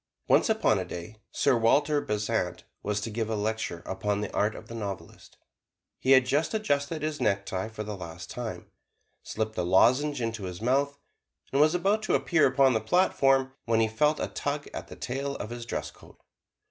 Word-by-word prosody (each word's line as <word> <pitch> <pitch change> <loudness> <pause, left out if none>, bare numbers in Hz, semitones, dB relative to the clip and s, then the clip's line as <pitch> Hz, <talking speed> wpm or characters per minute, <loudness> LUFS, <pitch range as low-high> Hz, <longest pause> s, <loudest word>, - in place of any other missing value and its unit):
Once - - +4
upon 215 - +3
a - - -1
day, 90 +4 -8
Sir 140 -3 +2
Walter 145 +6 +3
Besant 105 -5 -2 0.2
was 105 0 -1
to 115 - -4
give 110 0 -2
a 110 - 0
lecture 105 -5 -2
upon 100 +2 -1
"The 105 - -4
Art 105 +1 +1
of - - -10
the - - -9
Novelist." 100 -4 -7 0.6
He 135 - +4
had 130 -1 +6
just 145 - 0
adjusted 150 -6 -1
his 155 -1 -2
necktie 100 0 0
for 110 -1 -6
the 105 0 -5
last 85 -4 -8
time, - - -6 0.5
slipped 110 0 -3
a - - +2
lozenge 125 +12 +3
into 115 -4 -3
his 90 -1 -6
mouth, 140 +5 +1 0.5
and 140 - +3
was 155 +3 +4
about 200 +5 +2
to 215 - +1
appear 165 -5 +3
upon 130 0 +4
the 110 - +1
platform, 135 -2 +3
when 115 -1 +2
he 110 - +3
felt 150 +8 +1
a - - 0
tug 145 0 -3
at - - -6
the - - -10
tail 140 +2 -3
of 105 - -6
his 120 -1 -6
dress - - -3
coat. - - -18
115 Hz, 195 wpm, -28 LUFS, 105-140 Hz, 0.6 s, had